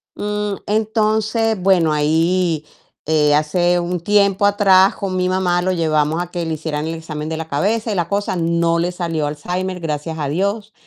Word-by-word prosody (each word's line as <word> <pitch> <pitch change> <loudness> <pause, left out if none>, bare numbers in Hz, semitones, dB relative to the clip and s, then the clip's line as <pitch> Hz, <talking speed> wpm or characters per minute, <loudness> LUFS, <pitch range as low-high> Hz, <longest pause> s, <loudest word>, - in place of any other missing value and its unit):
Mm, 210 0 -2
entonces, 220 +1 0
bueno 180 -4 +3
ahí, 160 +2 +1 0.4
eh, 150 -1 +3
hace 175 +4 +2
un 175 0 -3
tiempo 200 +1 +2
atrás 195 -2 +4
con 195 -2 -3
mi 185 0 0
mamá 180 -1 +1
lo 185 +1 0
llevamos 160 -1 +1
a 175 - -4
que 175 -1 -4
le 160 - -2
hicieran 155 -1 -4
el 165 - -3
examen 155 -1 -6
de 160 - -3
la 160 0 -5
cabeza 210 +10 -1
y - - -3
la 170 -2 -1
cosa, 200 -1 -1
no 170 0 +1
le 175 +1 0
salió 165 -4 -2
Alzheimer, 180 +5 -4
gracias 160 0 -4
a 145 - -2
Dios, 200 +7 -2
175 Hz, 180 wpm, -19 LUFS, 160-200 Hz, 0.4 s, atrás